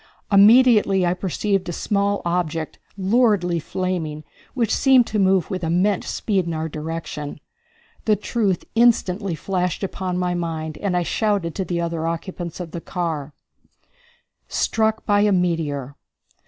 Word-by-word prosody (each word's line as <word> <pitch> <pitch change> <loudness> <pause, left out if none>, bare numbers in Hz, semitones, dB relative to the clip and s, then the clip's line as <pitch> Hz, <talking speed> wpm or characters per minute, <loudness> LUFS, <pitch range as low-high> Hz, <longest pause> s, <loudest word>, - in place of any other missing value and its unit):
Immediately 210 -2 +6
I 175 - +2
perceived 190 +1 -1
a - - -1
small 200 +3 0
object, 165 -2 -2 0.2
luridly 195 -4 +2
flaming, 160 -3 -3 0.3
which 230 -4 +1
seemed 265 -3 +5
to 215 - -2
move 190 -1 +2
with 185 -2 -3
immense 180 +4 +1
speed 195 -5 -1
in 165 - -2
our 160 +1 -2
direction. 155 -1 -6 0.7
The 215 - +4
truth 210 -2 -1
instantly 210 -6 +2
flashed 180 +3 -2
upon 185 -1 -3
my 180 -1 0
mind, 160 -3 -4
and 190 -3 0
I 175 - +1
shouted 195 -2 0
to 190 - -3
the 175 0 -2
other 165 -1 -2
occupants 170 +1 -5
of 170 -3 -6
the 170 - -6
car: 160 -6 -4 1.1
Struck 220 0 0
By 205 -1 +3
A 210 0 +3
Meteor! 160 -7 -1
180 Hz, 140 wpm, -22 LUFS, 165-205 Hz, 1.1 s, Immediately